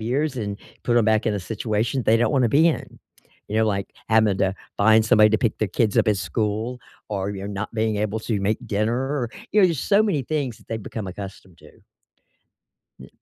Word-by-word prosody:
years 130 Hz, +6 st, -1 dB
and 100 Hz, -3 st, -3 dB, 0.3 s
put 120 Hz, -1 st, +1 dB
'em 115 Hz, -, +4 dB
back 110 Hz, +1 st, +2 dB
in 110 Hz, -, +1 dB
a 100 Hz, -, -2 dB
situation 110 Hz, +5 st, -2 dB
they 110 Hz, -, +5 dB
don't 120 Hz, +5 st, +1 dB
wanna 130 Hz, -4 st, +3 dB
be 155 Hz, +6 st, +5 dB
in. 160 Hz, -, -4 dB, 0.5 s
You 105 Hz, -, -2 dB
know, 110 Hz, 0 st, +3 dB
like, 100 Hz, -2 st, -2 dB, 0.2 s
having 110 Hz, -3 st, +3 dB
to 95 Hz, 0 st, +1 dB, 0.2 s
find 110 Hz, +2 st, +5 dB
somebody 110 Hz, -1 st, +6 dB
to 110 Hz, -, +2 dB
pick 115 Hz, -1 st, -1 dB
their 110 Hz, -, 0 dB
kids 105 Hz, +1 st, +1 dB
up -, -, +3 dB
at 105 Hz, -, +3 dB
school 110 Hz, +4 st, -2 dB, 0.3 s
or 100 Hz, -1 st, -2 dB
you're 100 Hz, 0 st, -6 dB
not 105 Hz, +3 st, -5 dB
being 110 Hz, -1 st, 0 dB
able 105 Hz, +1 st, -1 dB
to 110 Hz, -2 st, -2 dB
make 105 Hz, +2 st, -1 dB
dinner, 120 Hz, +5 st, -1 dB, 0.2 s
you 210 Hz, -, +5 dB
know, 185 Hz, -, +7 dB
there's 165 Hz, -5 st, -1 dB
so 205 Hz, +1 st, +3 dB
many 185 Hz, -11 st, 0 dB
things 135 Hz, -4 st, -2 dB
that -, -, -22 dB
they've 110 Hz, -1 st, -4 dB
become 105 Hz, 0 st, -6 dB
accustomed 95 Hz, -2 st, -9 dB
to. -, -, -17 dB, 1.3 s
Y -, -, -12 dB
110 Hz, 215 wpm, -23 LUFS, 105-125 Hz, 1.3 s, know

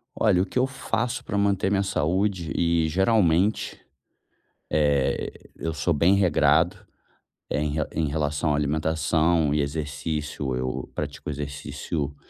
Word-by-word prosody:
Olha 95 Hz, -5 st, +3 dB
o -, -, +1 dB
que -, -, -6 dB
eu 130 Hz, -, +3 dB
faço 125 Hz, -2 st, -2 dB
pra 100 Hz, -, -3 dB
manter 100 Hz, -1 st, +2 dB
minha 100 Hz, 0 st, +2 dB
saúde 95 Hz, -2 st, 0 dB
e 85 Hz, -1 st, +2 dB
geralmente, 95 Hz, +1 st, +2 dB, 0.9 s
eh, 75 Hz, -3 st, +1 dB, 0.2 s
eu 80 Hz, -, -3 dB
sou 85 Hz, -, 0 dB
bem 85 Hz, +7 st, +4 dB
regrado. 85 Hz, -3 st, +3 dB, 0.7 s
É 75 Hz, -, 0 dB
em 75 Hz, -1 st, -1 dB
re 80 Hz, -1 st, 0 dB
em 80 Hz, -1 st, 0 dB
relação 75 Hz, +1 st, 0 dB
à -, -, +2 dB
alimentação 80 Hz, +1 st, +1 dB
e 75 Hz, -, +1 dB
exercício 75 Hz, -2 st, -3 dB
eu 65 Hz, 0 st, -3 dB
pratico -, -, -5 dB
exercício 70 Hz, 0 st, -4 dB
80 Hz, 135 wpm, -25 LUFS, 75-95 Hz, 0.9 s, bem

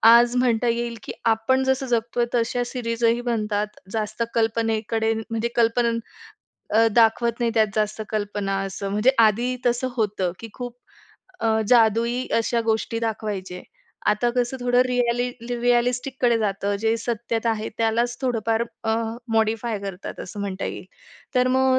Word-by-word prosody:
आज 240 Hz, +1 st, +4 dB
म्हणता 245 Hz, -1 st, +2 dB
येईल, 235 Hz, 0 st, -1 dB
की -, -, -6 dB, 0.2 s
आपण 260 Hz, +4 st, +1 dB
जसं 265 Hz, +1 st, +1 dB
जगतोय 235 Hz, 0 st, 0 dB
तशा 240 Hz, +1 st, +1 dB
सिरीजही 235 Hz, -1 st, 0 dB
बनतात. 210 Hz, -3 st, -1 dB, 0.2 s
जास्त 215 Hz, +1 st, -2 dB
कल्पनेकडे 225 Hz, 0 st, +1 dB, 0.2 s
म्हणजे 225 Hz, 0 st, -1 dB
कल्पनेनं 230 Hz, 0 st, +2 dB, 0.7 s
अ, 225 Hz, +2 st, +5 dB
दाखवत 235 Hz, 0 st, +4 dB
नाही. 235 Hz, -1 st, +2 dB
त्यात 220 Hz, -1 st, +4 dB
जास्त 215 Hz, 0 st, -1 dB
कल्पना 205 Hz, -2 st, -2 dB
असं 195 Hz, +1 st, -5 dB
म्हणजे 210 Hz, +5 st, +4 dB
आधी 235 Hz, +3 st, +3 dB
तसं 245 Hz, +2 st, +1 dB
होतं, 200 Hz, -5 st, 0 dB
की 230 Hz, -, -8 dB
खूप 245 Hz, -1 st, -6 dB, 0.6 s
अ, 220 Hz, -1 st, +2 dB
जादुई 235 Hz, +1 st, +3 dB
अशा 230 Hz, +1 st, +1 dB
गोष्टी 225 Hz, 0 st, 0 dB
दाखवायचे. 205 Hz, -5 st, -3 dB, 0.4 s
आता 210 Hz, +3 st, +3 dB
कसं 245 Hz, +1 st, 0 dB
थोडं 245 Hz, 0 st, +3 dB
रिअलि 245 Hz, 0 st, +1 dB, 0.2 s
रिअलिस्टिककडे 245 Hz, 0 st, +1 dB
जातं, 200 Hz, -1 st, -1 dB
जे 225 Hz, +1 st, +2 dB
सत्यता 230 Hz, 0 st, -1 dB
आहे 220 Hz, -1 st, -2 dB
त्यालाच 230 Hz, +2 st, +1 dB
थोडंफार 225 Hz, -2 st, +1 dB, 0.2 s
अ 220 Hz, 0 st, +2 dB, 0.4 s
मॉडिफाय 220 Hz, 0 st, +1 dB
करतात, 195 Hz, -2 st, -6 dB
असं 205 Hz, +2 st, -7 dB
म्हणता 195 Hz, -1 st, -3 dB
येईल. -, -, -5 dB, 0.5 s
तर 250 Hz, 0 st, +3 dB
मग 260 Hz, 0 st, +3 dB
230 Hz, 140 wpm, -23 LUFS, 220-240 Hz, 0.7 s, अ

